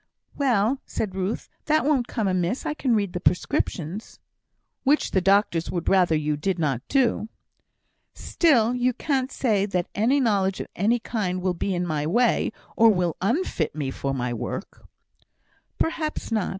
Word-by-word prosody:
"Well!" 255 -1 +1
said 205 -4 -3
Ruth, 190 +3 -3 0.2
"that 310 -1 +2
won't 275 -5 +2
come 220 -5 -1
amiss; 185 +5 -1
I - - -1
can 260 -6 +1
read 200 -4 -1
the 180 - -2
prescriptions." 180 +2 -1 0.7
"Which 290 +3 +2
the 190 - +2
doctors 195 -3 +2
would 175 -2 -3
rather 180 -4 +4
you 150 -1 0
did 185 +5 -1
not 140 -7 0
do." 255 -5 +1 0.9
"Still, 250 -9 +2
you 250 0 +1
can't 265 0 -1
say 210 -6 +1
that 180 -3 -2
any 240 +8 +2
knowledge 200 -6 +1
of - - -3
any 220 +6 +2
kind 205 -6 -2
will 185 0 0
be 185 +2 -2
in 175 0 -1
my 155 -3 -1
way, 235 +7 +2 0.2
or 230 0 +6
will 180 -5 +1
unfit 210 - 0
me 140 -4 -2
for 135 +1 -3
my 125 -2 -2
work." 115 - -6 0.9
"Perhaps 315 -5 -2
not. 215 -4 0
200 Hz, 165 wpm, -24 LUFS, 175-245 Hz, 0.9 s, or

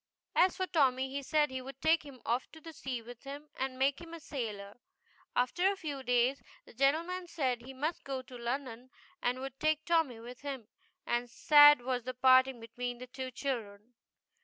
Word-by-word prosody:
As 370 +1 +4
for 375 - 0
Tommy 265 -6 +2
he 280 +1 -3
said 295 +1 +2
he 260 0 -4
would 270 +1 -9
take 320 +3 +3
him 275 -4 -13
off 240 +3 -1
to 320 0 -11
sea 255 -5 -5
with 240 0 -11
him 285 +2 -9
and 265 -1 -3
make 275 +3 +1
him 335 0 -9
a - - -9
sailor. 215 -8 -6 0.6
After 350 +10 +2
a - - -3
few 295 -7 -5
days, 250 +2 +2 0.2
the - - -15
gentleman 330 +8 +1
said 260 -8 -1
he 260 +3 -10
must 310 +6 -2
go 270 -2 -4
to 255 - -12
London 245 0 -4 0.3
and 250 +1 0
would 270 0 -7
take 310 0 +1
Tommy 325 -9 +2
with 245 +3 -10
him, 270 -6 -6 0.4
and 240 0 -1
sad 295 +2 +7
was 250 -1 -1
the 255 +1 -5
parting 260 0 +5
between 245 +2 -5
the 250 - -8
two 255 +1 -6
children. 240 -4 -5
265 Hz, 190 wpm, -32 LUFS, 245-295 Hz, 0.6 s, sad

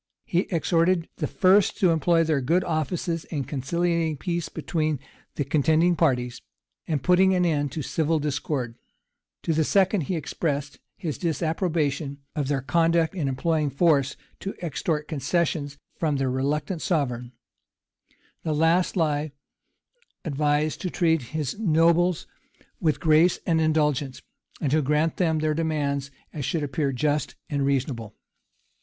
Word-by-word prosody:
He 175 +2 0
exhorted 170 0 +1
the - - -1
first 195 +1 +3
to 185 -3 +4
employ 165 +1 +3
their 155 -4 +1
good 170 +8 +2
offices 165 +1 -2
in 145 -4 -3
conciliating 165 +3 -1
peace 170 +3 -3
between 155 -3 -2 0.4
the 145 - 0
contending 160 +5 +3
parties, 125 -7 0 0.5
and 150 -5 -1
putting 185 +1 +4
an 180 -1 +2
end 145 -4 0
to 155 - -3
civil 160 +3 0
discord: 140 -5 -3 0.6
to 165 - +1
the 160 0 +2
second 190 +3 +3
he 175 +5 -2
expressed 145 -2 -3 0.2
his 160 -7 -4
disapprobation 160 -4 -1 0.2
of 145 -3 -1
their 135 -2 -1
conduct 165 +3 +2
in 165 -7 -2
employing 150 +3 0
force 140 -1 +2 0.2
to 195 - -5
extort 150 0 -2
concessions 145 -1 -1 0.2
from 155 -3 +1
their 135 -2 0
reluctant 145 +6 -1
sovereign: 125 -7 -1 1.1
the 155 - -1
last 165 +5 +2
lie 150 -3 0 0.9
advised 150 0 0
to 180 - -2
treat 165 -3 +2 0.2
his 150 +6 -3
nobles 170 -2 +3 0.5
with 155 -2 +1
grace 160 +3 +4
and 165 -2 +2
indulgence, 150 -4 0 0.4
and 140 - -1
to 155 +1 +3
grant 150 +3 +1
them 165 -3 +2
such - - 0
of - - -2
their 155 0 +1
demands 145 -3 -1 0.2
as 150 - -4
should 155 +3 -1
appear 145 0 -1
just 145 +3 -1 0.2
and 140 -1 0
reasonable. 125 -6 -2
155 Hz, 145 wpm, -25 LUFS, 145-170 Hz, 1.1 s, to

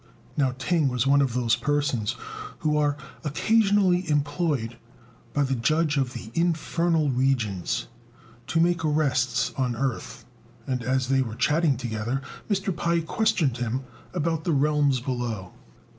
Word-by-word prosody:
Now 135 -3 +1
Ting 155 +2 +1
was 125 -1 0
one 140 +1 +5
of 130 -4 0
those 120 -2 +2
persons 125 -3 0 0.5
who 150 -1 +1
are 145 -1 +2 0.3
occasionally 190 +1 +2
employed 145 -5 0 0.5
by 145 - +1
the 135 -1 0
Judge 150 +5 +1
of 130 -3 0
the 110 - -8
Infernal 165 -1 +1
Regions 120 -4 0 0.6
to 165 - +1
make 170 0 +2
arrests 135 -5 +1
on 125 -2 0
earth; 130 0 -3 0.4
and, 130 -2 -2
as 130 +1 0
they 135 0 +3
were 115 -4 -3
chatting 150 0 +2
together, 120 +2 -3 0.3
Mr. 195 -2 0
Pai 170 0 +1
questioned 165 - +1
him 120 +2 -2 0.3
about 165 -2 -1
the 170 - +1
realms 145 -2 +2
below. 120 -7 -4
140 Hz, 140 wpm, -26 LUFS, 125-160 Hz, 0.6 s, one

